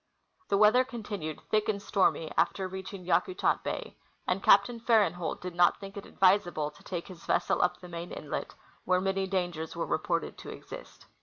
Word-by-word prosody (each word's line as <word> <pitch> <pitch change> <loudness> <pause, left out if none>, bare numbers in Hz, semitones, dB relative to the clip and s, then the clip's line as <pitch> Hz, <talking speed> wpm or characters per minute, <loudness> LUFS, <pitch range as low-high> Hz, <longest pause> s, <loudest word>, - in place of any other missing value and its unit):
The 200 - +3
weather 215 +5 +6
continued 205 - -6
thick 215 0 +2
and 205 -2 0
stormy 190 -5 +1
after 190 -1 +1
reaching 190 0 -7
Yaku 365 - +1
tat - - +2
bay, - - -5 0.3
and 180 +1 0
Captain 220 +6 +5
Farenholt 205 -8 +1
did 180 -1 -5
not 175 0 +4
think 195 0 -9
it 200 - -8
advisable 175 -6 +2
to 150 - -19
take 175 -2 -5
his 180 -3 -11
vessel - - +2
up 180 0 +1
the 180 - -11
main 170 0 -7
inlet, 150 - -5 0.3
where 185 0 +2
many 195 0 0
dangers 175 -4 -2
were - - -2
reported - - -1
to - - -9
exist. - - -10
190 Hz, 180 wpm, -30 LUFS, 175-200 Hz, 0.3 s, weather